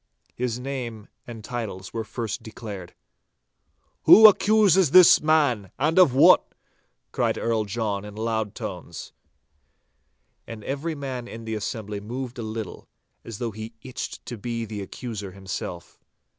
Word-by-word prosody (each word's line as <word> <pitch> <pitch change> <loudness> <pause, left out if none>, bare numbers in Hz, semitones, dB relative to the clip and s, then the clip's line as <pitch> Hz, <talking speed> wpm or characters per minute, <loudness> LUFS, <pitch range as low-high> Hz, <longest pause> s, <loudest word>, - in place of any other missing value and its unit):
His 125 -1 -2
names 125 -5 -6 0.2
and 115 -3 -9
titles 105 -5 -6
were 115 - -2
first 115 -1 -5
declared. 105 -6 -9 1.1
'Who 220 0 +10
accuses 200 -4 +4
this 180 +4 +8
man, 145 -10 +2
and 155 +7 +2
of 145 -9 +6
what?' 135 - +5 0.6
cried - - 0
Earl 115 -2 0
John 105 -1 -2
in 105 0 -10
loud 110 -1 -2
tones. - - -7 1.3
And 110 -2 -8
every 150 +4 -3
man 130 -4 -5
in 115 -1 -9
the 110 - -4
assembly 105 -1 -4
moved 125 +4 -6
a - - -3
little, 110 -3 -6 0.4
as 115 -3 -8
though 115 0 -3
he 110 +2 -9
itched 130 -2 -7
to 120 -3 -7
be 115 +1 -3
the 105 -1 -6
accuser 100 -2 -7
himself. 95 -2 -7
115 Hz, 140 wpm, -25 LUFS, 105-130 Hz, 1.3 s, Who